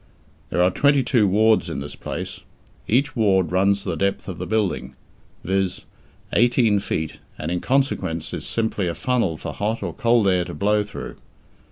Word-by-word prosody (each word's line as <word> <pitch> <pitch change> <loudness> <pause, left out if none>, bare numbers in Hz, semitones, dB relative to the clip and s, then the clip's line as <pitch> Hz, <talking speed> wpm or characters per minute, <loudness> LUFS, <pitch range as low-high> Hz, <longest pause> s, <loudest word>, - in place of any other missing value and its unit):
There 90 - +2
are 90 - +4
twenty 140 +4 +3
two 120 -4 +3
wards 110 +3 +3
in - - -3
this 70 +1 -7
place. - - -6 0.5
Each 140 +6 +1
ward 95 -7 +2
runs 100 +2 +2
the 90 -4 -2
depth 100 +4 -1
of 95 -3 -6
the 90 - -4
building, 95 -12 -1 0.5
viz., 95 0 -1 0.5
eighteen 115 -2 +4
feet, 80 -5 -3 0.2
and 75 +2 -4
in 90 - 0
consequence 95 - -1
is - - -5
simply 110 -4 -1
a 85 - -2
funnel 115 -11 0
for - - -6
hot 110 +2 -2
or - - -3
cold 115 -4 +3
air 90 -2 +3
to - - -7
blow 105 +1 +2
through. 105 - -8
100 Hz, 175 wpm, -22 LUFS, 90-115 Hz, 0.5 s, are